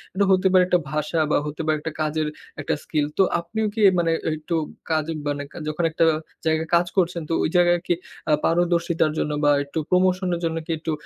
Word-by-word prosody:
এটা 200 +1 +3
হতে 185 0 +3
পারে 185 -1 +6
একটা 180 -1 +3
ভাষা 155 +2 -1
বা - - +4
হতে 150 +2 -5
পারে 155 -1 +1
একটা 160 +2 -5
কাজের 155 0 0 0.3
একটা - - -1
skill। 150 -2 0
তো 195 - +6 0.2
আপনিও 220 +6 -3
কি 220 - -2 0.2
মানে 165 -1 +1 0.3
একটু 160 +3 -3 0.4
কাজে 155 0 0 0.2
মানে 145 0 -2
কা - - -12
যখন 155 +3 -2
একটা 165 +1 +2 0.4
জায়গায় 160 0 +1
কাজ 175 +1 +3
করছেন 175 -2 +1
তো - - 0
ওই - - +1
জায়গায় 175 0 +4
কি - - +3 0.4
আ - - +3
পারদর্শিতার 170 -1 +1
জন্য 150 - -1
বা 145 - +5
একটু 140 +3 -4
promotion 185 +1 +2
এর - - -4
জন্য 165 0 -1
কি - - -4
একটু 160 0 -3
165 Hz, 210 wpm, -23 LUFS, 155-175 Hz, 0.4 s, পারে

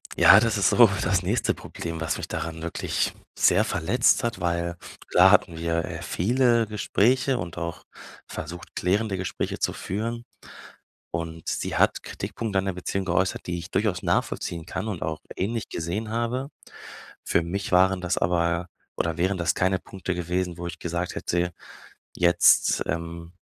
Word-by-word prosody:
Ja, 100 - +8
das 115 -2 +1
ist 100 - +4
so - - +7
das - - +2
nächste - - +1
Problem, 85 -1 -6
was 80 - -1
mich - - -5
daran 80 -1 -4
wirklich 85 - -1 0.2
sehr - - +4
verletzt 120 +10 +2
hat, 115 -4 -2
weil 85 0 -1 0.3
klar - - +7
hatten 80 - +3
wir, 85 0 -1
äh, - - -6
viele 120 +3 +2
Gespräche 120 +5 +1
und 85 -1 -6
auch 85 -1 -5 0.4
versucht, 85 +3 -7
klärende 100 +2 0
Gespräche 95 - -3
zu - - 0
führen. 115 +5 -4 0.9
Und 80 -1 -5
sie - - -2
hat - - +2
Kritikpunkte 105 -4 -3
an 95 - -2
der 95 - -1
Beziehung 95 +1 -3
geäußert, 95 +1 0
die 85 0 -2
ich 85 +2 -9
durchaus 100 -3 0
nachvollziehen 85 -1 -1
kann 95 +5 -4
und 95 -6 -4
auch 80 -1 -3 0.2
ähnlich 110 +4 -2
gesehen 95 +7 -3
habe. 120 +4 -2 0.7
Für 85 - +1
mich 95 +4 -4
waren 95 +1 +4
das 90 - -1
aber 85 0 +1 0.3
oder 85 0 -1
wären 95 +2 +1
das 85 - +1
keine 95 +1 +2
Punkte 90 -1 -5
gewesen, 90 0 -2
wo 85 - -6
ich 85 0 -7
gesagt 85 +1 -3
hätte: 90 0 -1 0.6
„Jetzt, 85 0 +4
ähm, 85 +1 -4
90 Hz, 160 wpm, -25 LUFS, 85-100 Hz, 0.9 s, Ja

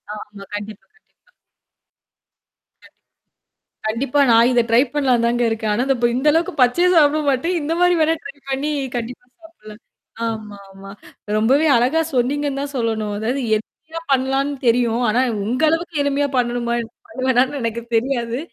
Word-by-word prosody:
ஆமா, - - -7 0.3
கண்டிப்பா. 205 -2 -8
கண்டிப்பா. - - -35 2.4
கண்டிப்பா. - - -13
கண்டிப்பா, 255 +5 0
நான் 230 +1 +5
இத 245 - +3
ட்ரை 235 +3 +5
பண்ணலாம்ன்னு 255 -5 +2
தாங்க 240 0 0
இருக்கேன். 220 -1 -1
ஆனா, 245 +4 0
இந்த 270 - +2
இப்ப 240 - +2
இந்த 270 +4 -2
அளவுக்கு 330 +1 0
பச்சையா 345 +9 +3
சாப்பிட 305 0 +4
மாட்டேன். 305 +7 0
இந்த 310 +3 -2
மாரி 355 0 +4
வேணா 315 +1 +3
ட்ரை 280 - -8 0.2
பண்ணி 275 +3 -1 0.3
கண்டிப்பா 245 +1 -6 0.2
சாப்புடுவேன். 215 -10 -14 0.5
ஆமாமா. 200 -3 -8 0.5
ரொம்பவே 265 +9 +3
அழகா 260 +7 +2 0.2
சொன்னீங்கன்னு 275 +2 0
தான் 285 0 -6
சொல்லணும். 220 -3 -2
அதாவது 245 +6 -2 0.2
எளிமையா 320 +9 -9
பண்ணலாம்ன்னு 270 +2 0
தெரியும். 235 0 +2
ஆனா 230 +4 +2 0.2
உங்க 250 +7 -2
அளவுக்கு 330 +1 -1
எளிமையா 285 0 0
பண்ணணுமா? 240 -1 -1 0.3
பண்ணுவேணான்னு 260 -1 0
எனக்கு 230 0 -2
தெரியாது. 240 0 0
250 Hz, 145 wpm, -20 LUFS, 230-285 Hz, 2.4 s, நான்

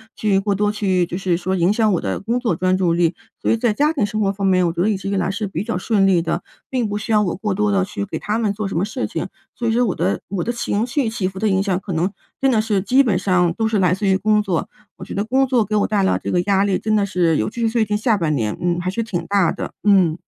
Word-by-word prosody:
去 200 -3 +1
过 200 0 0
多 205 +1 +1
去 190 -4 +1
就 175 - -5
是 185 -2 0
说 185 +2 -2
影 175 +3 +3
响 220 -1 +2
我 180 - +1
的 95 - -3
工 230 +4 -1
作 240 -3 0
专 185 0 +1
注 175 -3 +1
力。 170 0 +2 0.3
所 - - +1
以 230 - +2
在 225 -1 +1
家 295 +7 +2
庭 275 -10 0
生 215 +1 -3
活 195 -1 +2
方 195 0 -2
面， 185 -1 +3
我 170 - +1
觉 170 +1 -3
得 205 - +2
一 215 - +1
直 195 +1 -5
以 200 - 0
来 185 - 0
是 205 +2 -2
比 190 - -4
较 230 -6 -2
顺 195 0 +2
利 180 -3 +3
的， 170 +1 -2 0.3
并 250 -4 0
不 205 - -3
需 210 +2 -5
要 210 -1 +4
我 180 -5 -1
过 205 0 -2
多 210 +2 +1
地 195 -1 +2
去 200 +1 -4
给 - - -5
他 215 +2 -2
们 210 -3 0
做 210 0 -4
什 165 - -3
么 185 - +1
事 250 +4 -3
情， - - -4 0.3
所 235 - -3
以 225 - +2
说 245 +2 +3
我 200 - 0
的 180 +3 -1
我 190 -1 -2
的 240 +7 -2
情 235 -1 -1
绪 255 -2 0
起 210 -5 -2
伏 190 0 -7
的 215 0 +1
影 190 0 +2
响 195 -2 0
可 195 - -7
能 175 +3 0 0.3
真 270 - +2
的 225 -4 +3
是 215 -3 0
基 255 +8 +4
本 205 -8 +1
上 180 -3 +2
都 225 - +1
是 220 -2 0
来 180 -2 +3
自 200 +2 -1
于 190 - +4
工 210 +1 +2
作， 185 -6 -2 0.3
我 185 - -10
觉 - - -8
得 200 +2 -1
工 260 +4 +2
作 245 -5 +2
给 215 - -2
我 210 - +3
带 205 -2 +1
来 190 - +2
这 - - -2
个 180 - +2
压 195 -1 +2
力 200 -2 +1
真 215 -1 0
的 205 -2 +2
是 175 -4 +1
尤 - - 0
其 235 - -9
是 225 - +2
最 225 0 +1
近 210 0 -1
下 220 0 +2
半 165 -5 0
年， 110 -6 -1
嗯， 175 0 0
还 180 +1 -2
是 230 +5 -2
挺 195 -6 -4
大 200 -3 +2
的， - - -6
嗯。 185 -6 +4
200 Hz, 340 characters per minute, -20 LUFS, 185-220 Hz, 0.3 s, 要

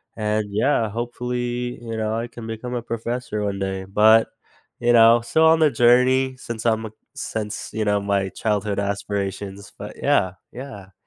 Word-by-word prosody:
and, 105 -1 -1
yeah, 115 +1 +1
hopefully, 120 +1 -3
you 115 -1 -5
know, 110 0 -1
I 115 - -4
can 115 -1 -10
become 115 +2 -6
a 120 - -2
professor 115 -2 -3
one 100 -1 -2
day, 95 -1 -3
but, 110 +3 +5 0.5
you 120 0 +3
know, 115 0 +7
still 160 +7 +2
on 160 0 +5
the 155 -3 +4
journey 125 +2 +4
since 115 -2 -7
I'm 110 -1 +1
a 110 - -7 0.2
since, 105 -1 -5
you 110 -1 -1
know, 105 0 +2
my 100 -1 0
childhood 105 -1 -2
aspirations, 100 0 -4
but, - - -8
yeah, 95 -1 +2 0.2
yeah. 110 -7 -10
110 Hz, 170 wpm, -22 LUFS, 105-120 Hz, 0.5 s, know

